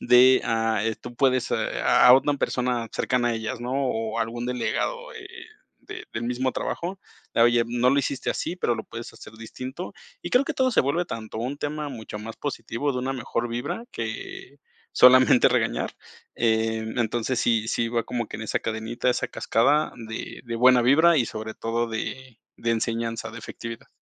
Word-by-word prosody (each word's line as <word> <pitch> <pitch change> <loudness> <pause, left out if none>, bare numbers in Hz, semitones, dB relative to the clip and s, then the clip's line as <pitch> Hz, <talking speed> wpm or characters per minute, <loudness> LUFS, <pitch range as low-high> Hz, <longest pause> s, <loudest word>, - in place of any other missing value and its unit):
de, 130 +1 +6
ah, 115 -2 +1
eh, 110 -1 -1
tú 120 - -9
puedes, 130 -2 +2
eh, - - +2 0.3
a - - +5
a 125 - +11
una 140 +2 +4
persona 125 -4 -1
cercana 125 -2 +1
a 120 - 0
ellas, 115 +3 -4
¿no? 120 +2 -4
O 115 -5 -1
algún 115 +1 -2
delegado, 125 -1 -2
eh, - - -9 0.6
de - - -8
del 110 - -4
mismo 125 +2 -1
trabajo, 185 +3 -4 0.3
de: 115 - +4
"Oye, 120 0 +4
no 120 +2 +2
lo 140 - +3
hiciste 135 -1 -1
así, - - -3
pero 120 -10 0
lo - - -6
puedes 115 +1 -8
hacer - - -13
distinto". 130 +9 -7 0.3
Y - - -5
creo 250 +3 +4
que 315 - -3
todo 260 -1 +2
se - - +4
vuelve 145 +6 0
tanto 110 -7 -6
un 130 +5 -3
tema 150 0 -3
mucho 110 -5 -7
más 110 +1 -8
positivo, 140 0 -3
de 125 - -3
una 130 +2 -2
mejor 120 -1 -3
vibra, 120 - -4
que 390 0 -6 0.3
solamente 125 0 +7
regañar. - - -1 0.4
Eh, 110 -1 +1
entonces, 120 +2 0
sí, 115 -2 +2
sí 115 0 0
va 115 -1 -1
como 120 -2 -3
que - - -6
en 110 - -7
esa - - -1
cadenita, 115 +3 -1
esa - - -1
cascada 145 +7 +2 0.2
de 110 0 -6
de 120 -1 -5
buena 125 +1 +6
vibra 160 +7 +5
y, 125 -5 +2
sobre 110 0 -6
todo, 115 +1 -2
de 120 +2 -5 0.2
de 115 - -1
enseñanza, 115 0 -2
de 115 - -8
efectividad. 115 +1 -8
120 Hz, 190 wpm, -25 LUFS, 115-130 Hz, 0.6 s, a